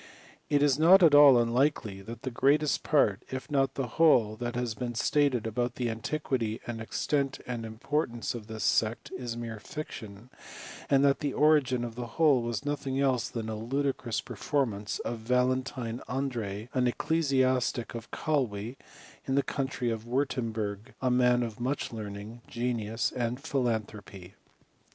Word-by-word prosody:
It 145 -1 +3
is 145 -1 +3
not 180 +4 +7
at 160 -3 +7
all 145 -3 +9
unlikely 120 -4 +1
that 115 +3 -9
the 130 - -3
greatest 145 +4 +2
part, 110 -9 +2
if 130 +2 -6
not 135 -2 +1
the 135 - -1
whole 120 -5 +4
that 120 0 -4
has 120 -2 -1
been 120 +2 -4
stated 135 -1 +2
about 120 +2 -1
the 120 -2 -1
antiquity, 115 -1 -2
and 115 -2 -5
extent, 140 +4 -1
and 120 -2 -4
importance 115 +1 -2
of 115 -3 -8
this 110 -2 -5
sect, 110 +3 +1
is 120 -2 -5
mere 115 -2 -5
fiction, 110 -4 -8 0.6
and 140 0 +4
that 140 -1 +3
the 145 -3 -2
origin 145 -5 +3
of 120 -1 -4
the 120 +1 -5
whole 150 -6 +5
was 120 +3 -3
nothing 140 -2 -2
else 130 -3 +1
than 115 -3 -4
a 110 - -3
ludicrous 125 +1 -2
performance 110 -8 -2
of 120 -1 -3
Valentine 125 0 0
Andreae, 120 -5 -3
an 125 -1 +2
ecclesiastic 130 -4 +1
of 115 -1 -7
Calwe, 125 -6 -2 0.5
in 135 - 0
the 140 - +3
country 130 -3 -2
of 115 0 -5
Wirtemburg, 115 -5 -2
a 130 -1 +1
man 125 0 +4
of 115 -2 -6
much 130 +1 -2
learning, 105 +1 -7
genius, 115 -2 -1
and 120 0 -1
philanthropy. 105 -8 -3
125 Hz, 155 wpm, -29 LUFS, 115-135 Hz, 0.6 s, all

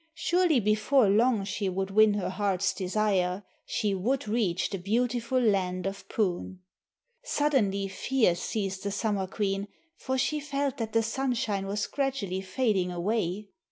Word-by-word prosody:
Surely 345 -4 +2
before 215 +4 +3
long 220 +1 +3
she 195 0 -2
would 190 +1 -2
win 215 0 +5
her 195 -2 -2
heart's 195 0 0
desire, 190 -1 0 0.2
she 210 -2 0
would 230 +7 -1
reach 205 -5 0
the 195 - -3
beautiful 235 +5 0
land 190 -5 +1
of 195 0 -5
Poon. 185 -3 -2 0.6
Suddenly 240 - +1
fear 220 +1 +1
seized 190 +1 -3
the 200 - -2
Summer 200 -1 -1
Queen, 195 0 -2 0.3
for 260 0 -2
she 300 +4 0
felt 285 -2 -2
that 225 -3 -4
the 225 0 +3
sunshine 230 -5 -1
was 205 +1 -1
gradually 260 -10 -2
fading 195 -3 0
away. 195 +2 -2
205 Hz, 145 wpm, -28 LUFS, 195-240 Hz, 0.6 s, win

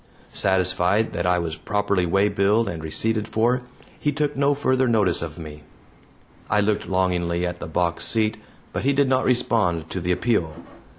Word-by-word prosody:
Satisfied 95 +3 +2
that - - -1
I 90 0 +3
was 85 -2 -3
properly 100 -4 0
waybilled 100 +4 +2
and 80 -2 -5
receipted 110 +7 -1
for, 120 +3 +1 0.4
he 150 - 0
took 150 0 -1
no 140 +1 +2
further 130 -2 +1
notice 105 -7 +2
of 80 -2 -6
me. 75 -2 -9 0.9
I 105 - +3
looked 105 0 0
longingly 90 -2 0
at 90 0 -4
the - - -6
box 85 +2 -1
seat, 110 -1 0 0.4
but - - -2
he 140 +2 +2
did 140 0 +2
not 130 0 +1
respond 100 -10 +1
to 95 - -3
the 90 +1 -1
appeal. 90 -6 0
100 Hz, 170 wpm, -23 LUFS, 85-115 Hz, 0.9 s, I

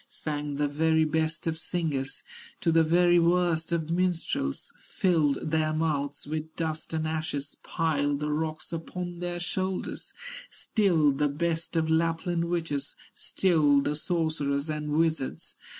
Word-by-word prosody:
Sang 145 -1 -3
the 145 +1 +1
very 160 +2 +3
best 160 +1 -1
of 160 -1 -1
singers 155 -7 -2 0.4
To 165 - +3
the 165 0 +5
very 175 +2 +5
worst 170 -1 +2
of 165 -1 -1
minstrels, 170 - -1
Filled 155 -5 +1
their 155 -1 +2
mouths 145 -3 -1
with 155 +1 -4
dust 160 -1 -3
and 160 -1 -1
ashes, 155 -3 -3
Piled 145 -4 0
the 150 0 -1
rocks 155 +1 -3
upon 175 +1 -5
their 175 0 -2
shoulders, 185 +2 -3 0.4
Stilled 160 - +2
the 150 -1 +3
best 165 +3 -2
of 160 -1 +2
Lapland 165 +1 +1
witches, 165 -5 -2 0.2
Stilled 150 -6 +3
the 145 - 0
sorcerers 155 -3 0
and 150 0 -3
wizards. 155 -2 0
160 Hz, 135 wpm, -28 LUFS, 150-170 Hz, 0.4 s, the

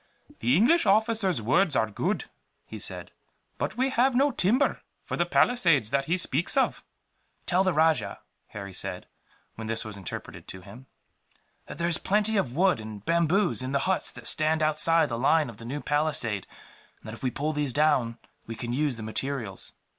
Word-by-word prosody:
"The 125 +6 +2
English 250 - +4
officer's 210 - +2
words 155 - +2
are 110 - +2
good," 180 - -2 0.4
he - - -9
said, - - -7 0.5
"but - - -3
we 260 +2 +1
have 255 +1 +2
no 280 +3 +3
timber 245 +5 +1 0.2
for - - -4
the - - 0
palisades 165 - +3
that 140 0 +1
he 170 +5 +1
speaks 170 - 0
of." 265 - +1 0.6
"Tell 185 +1 +2
the 190 - +2
rajah," 160 -1 +1 0.3
Harry 100 -2 -8
said, - - -4 0.5
when 110 0 -7
this 115 0 -2
was 105 -2 -7
interpreted 95 -4 -7
to 95 - -9
him, 105 +8 -13 0.8
"that - - -8
there 170 - 0
is 170 -2 0
plenty 210 +2 +1
of 135 - 0
wood 185 -5 +3
and 110 -1 -9
bamboos 170 +1 +2
in 130 +1 -4
the 140 - +2
huts 190 0 0
that - - -12
stand 155 0 +1
outside 160 +2 +3
the 115 -1 -4
line 150 +1 +2
of 110 - -16
the 115 - -11
new 140 +5 -4
palisade; 145 -9 0 0.5
and - - -15
that 110 - -7
if 115 - -10
we 130 - 0
pull 150 +5 -2
these 145 -3 -1
down, 130 -5 +2 0.3
we 115 - -6
can 120 +1 -4
use 140 -2 0
the 110 - -7
materials. 110 -2 -3
150 Hz, 190 wpm, -27 LUFS, 115-185 Hz, 0.8 s, English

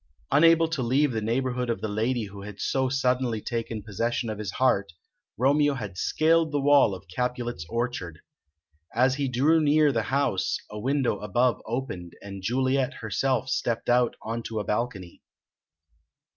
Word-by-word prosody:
Unable 165 +3 +5
to 155 -5 -2
leave 130 +4 +2
the 110 -2 -2
neighbourhood 125 +2 -1
of 115 - -1
the - - -3
lady 115 +3 -1
who 100 -1 -9
had 100 0 -9
so 130 -1 0
suddenly 125 -3 0
taken 115 -1 -4
possession 115 +3 -2
of 105 - -6
his 105 -3 -4
heart, 100 -9 +1 0.4
Romeo 145 +3 +3
had 105 -7 -6
scaled 160 - +2
the 145 - 0
wall 140 -7 +4
of 90 - -13
Capulet's 120 -2 -3
orchard. 115 -9 -3 0.8
As 130 +2 +4
he 140 0 -1
drew 145 +6 +3
near 150 0 +4
the 115 -4 0
house, 135 -9 +1
a 105 - -6
window 130 -3 0
above 120 +4 +1
opened, 110 -8 -4
and 100 -1 -8
Juliet 130 +5 0
herself 125 +4 -1
stepped 120 -2 -1
out 120 0 +3
on 115 +1 -3
to 110 -1 -4
a - - -2
balcony. 105 -6 -3
120 Hz, 160 wpm, -26 LUFS, 105-135 Hz, 0.8 s, Unable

